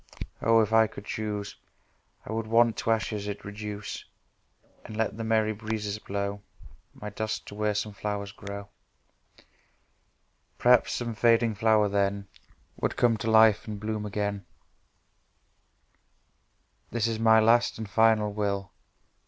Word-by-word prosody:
—Oh!—If 115 -1 +3
I 110 0 +6
could 105 - -11
choose 105 -1 -4 0.7
I - - -7
would 110 0 -3
want 115 0 +4
to 120 - -3
ashes 110 -2 0
it 100 0 -6
reduce, 105 0 -6 0.8
And 110 - -9
let 110 -2 0
The 115 - -5
merry 110 -1 +1
breezes 105 -1 -4
blow 100 0 -4 0.5
My 105 0 -7
dust 110 +1 -4
to - - -10
where 105 0 -1
some 105 0 -2
flowers 100 0 -4
grow 100 -1 -8 1.9
Perhaps 125 0 +4
some 120 -2 -3
fading 115 0 +3
flower 110 0 +3
then 100 0 0 0.5
Would - - -2
come 120 -2 +3
to 110 - -3
life 110 -1 +5
and 105 -2 -5
bloom 105 0 -3
again 100 -1 -3 2.5
This 120 -2 -1
is 115 -1 -1
my 110 0 +6
Last 115 +2 +3
and 110 -1 -5
Final 110 0 +3
Will. 100 -2 -2
105 Hz, 135 wpm, -27 LUFS, 105-110 Hz, 2.5 s, I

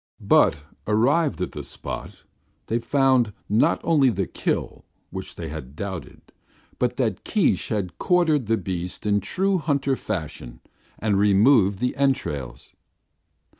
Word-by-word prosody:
But 75 - +3 0.2
arrived 130 - +2
at - - -4
the - - -6
spot, - - -7 0.4
they 115 - 0
found 130 -3 +2
not 120 +10 +3
only 150 -6 +4
the 95 -4 -1
kill, - - -3 0.3
which - - -6
they - - -6
had 65 +3 -8
doubted, 95 0 -7 0.5
but 125 0 0
that 110 -8 -1
Keesh 210 -7 +1
had 95 -7 -3
quartered 160 - +2
the 115 0 +2
beasts 90 -1 -5
in 105 0 +3
true 185 - 0
hunter 140 -3 0
fashion, 75 - -6 0.4
and 105 -3 +1
removed 100 0 +4
the 125 +5 -1
entrails. 75 - -2
110 Hz, 130 wpm, -24 LUFS, 95-140 Hz, 0.5 s, only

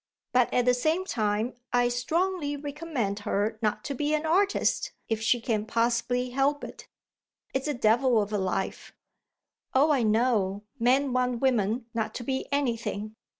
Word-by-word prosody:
But 250 -1 +3
at 245 - +2
the 250 - +5
same 315 +9 +1
time 215 - -1 0.2
I 245 0 +3
strongly 295 +5 -1
recommend 285 -8 -3
her 210 +2 -1
not 215 -2 0
to 280 - -3
be 295 +3 0
an 305 +1 -2
artist 385 +5 +1 0.2
if 220 -1 -1
she 240 +2 +3
can 225 -2 -1
possibly 240 +2 0
help 275 +3 +1
it. - - -9 0.7
It's 265 +2 -1
a 295 - -1
devil 235 +1 +3
of 205 0 -2
a 205 - +1
life." 190 0 -3 0.8
"Oh 290 +4 +5
I 275 -4 +3
know; 215 -3 +1 0.2
men 260 +3 +3
want 250 -1 +1
women 230 -2 +1
not 220 -2 -2
to 245 - -4
be 265 +2 -2
anything." 230 -6 -2
245 Hz, 160 wpm, -27 LUFS, 220-280 Hz, 0.8 s, the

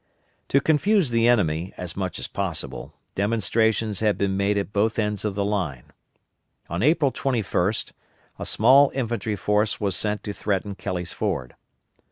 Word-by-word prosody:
To 140 - +3
confuse 160 - +2
the 115 0 +3
enemy 90 -7 +1
as 90 -2 -5
much 95 -2 -3
as - - -4
possible, 95 -5 -4 0.2
demonstrations 110 0 +1
had 105 -2 +1
been 100 -1 0
made 100 +1 +1
at 100 0 -3
both 110 +2 +1
ends 105 -2 -1
of 105 -2 -2
the 100 0 0
line. 90 -12 -3 0.8
On 85 +2 -2
April 150 +1 +3
21st 110 -7 -1 0.5
a - - -4
small 135 +5 +5
infantry 115 -4 -2
force 105 +3 +1
was 100 -3 0
sent 105 +2 -1
to 105 - -4
threaten 100 -1 -2
Kelly's 90 -3 -4
Ford. 60 -1 -3
105 Hz, 155 wpm, -24 LUFS, 95-115 Hz, 0.8 s, small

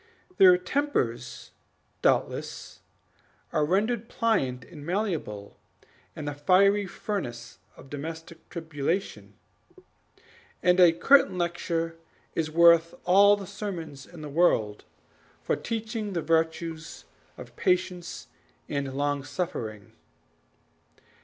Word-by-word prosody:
Their 185 -2 +8
tempers, 155 - -2 0.5
doubtless, - - -1 0.7
are 150 - +2
rendered 215 +8 0
pliant 135 - 0
and 150 -4 -12
malleable 165 - -3 0.6
in 150 - -6
the 145 - -3
fiery 195 +7 +3
furnace 125 - -5 0.2
of - - -13
domestic 160 +3 -8
tribulation; 155 - -3 1.3
and 180 +1 +4
a 175 -2 +8
curtain 185 +4 +4
lecture 170 -1 -2 0.4
is 160 -1 -1
worth 170 0 +5
all 200 +3 +6
the 200 - -7
sermons 165 -9 -7
in 170 -3 -12
the - - -5
world 140 -10 +1 0.6
for - - +1
teaching 225 -2 -4
the 170 -3 -2
virtues 160 0 -1 0.3
of - - -11
patience 180 -2 -1 0.4
and 140 -1 -3
long 145 0 -1
suffering. 115 - -5
165 Hz, 100 wpm, -27 LUFS, 145-185 Hz, 1.3 s, Their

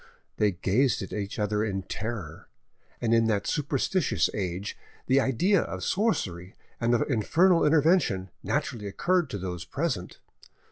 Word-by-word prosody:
They 105 -2 +2
gazed 100 +6 +1
at 95 - -8
each 100 -1 -4
other 105 0 0
in 95 -3 -2
terror, 105 -7 -6 0.5
and 115 -1 +1
in 115 -1 +4
that 105 -3 0
superstitious 150 +3 0
age 95 0 -3 0.3
the 130 +1 +4
idea 180 - +2
of - - -5
sorcery 95 - -1 0.2
and 120 +1 +2
of 115 - +2
infernal 165 - +3
intervention 150 - +3
naturally 105 -4 -2
occurred 175 - +1
to 105 - -4
those 90 -2 -5
present. 130 - -3
110 Hz, 140 wpm, -27 LUFS, 95-150 Hz, 0.5 s, in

